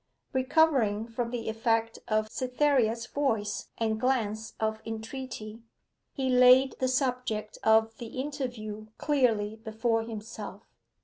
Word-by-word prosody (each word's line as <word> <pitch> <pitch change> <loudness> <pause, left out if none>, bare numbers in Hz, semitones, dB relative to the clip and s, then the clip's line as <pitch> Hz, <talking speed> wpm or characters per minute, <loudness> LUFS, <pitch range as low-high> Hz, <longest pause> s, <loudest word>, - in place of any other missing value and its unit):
Recovering 260 -6 +3
from 235 0 -3
the 235 -1 -4
effect 225 0 0
of 215 0 +1
Cytherea's 250 -3 +1
voice 225 -7 -1
and 220 -1 0
glance 225 -4 -1
of 220 0 -1
entreaty, 225 0 -6 0.5
he 270 -2 -1
laid 255 +1 +6
the 260 - +1
subject 250 -5 -1
of 220 0 +4
the 235 +2 -6
interview 245 -7 -4
clearly 225 -7 +1
before 225 +1 0
himself. 215 -3 -7
230 Hz, 115 wpm, -29 LUFS, 220-255 Hz, 0.5 s, laid